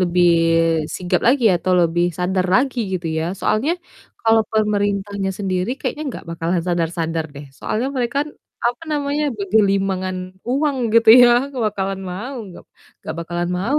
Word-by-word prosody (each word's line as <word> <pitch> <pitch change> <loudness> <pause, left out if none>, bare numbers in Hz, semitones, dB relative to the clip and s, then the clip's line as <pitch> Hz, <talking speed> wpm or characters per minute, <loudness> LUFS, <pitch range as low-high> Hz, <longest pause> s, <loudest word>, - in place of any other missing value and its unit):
lebih 175 -1 +3 0.7
sigap 180 -1 0
lagi 255 0 +3
atau 185 +1 -1
lebih 170 +1 +2
sadar 185 +1 0
lagi 260 +3 +2
gitu 175 -2 -3
ya. 160 - -1 0.2
Soalnya 270 +10 +1 0.5
kalau 225 0 +4
pemerintahnya 205 -2 0
sendiri 190 +2 -1
kayaknya 300 - -3
nggak - - -8
bakalan 170 +1 -1
sadar-sadar 165 -1 -1
deh, 145 +1 -9
soalnya 240 +5 -2
mereka 245 0 -1
kan, 295 - -2 0.4
apa 245 +5 -2
namanya, 290 0 -1
bergelimangan 195 -2 +1 0.3
uang 280 +2 +1 0.2
gitu 230 0 +4 0.2
ya 240 - +6 0.3
bakalan 195 -2 -2
mau, 240 +9 -6 0.2
gak - - -13 0.4
gak - - -4
bakalan 175 +1 -3
mau 235 +11 0
195 Hz, 145 wpm, -20 LUFS, 180-235 Hz, 0.7 s, ya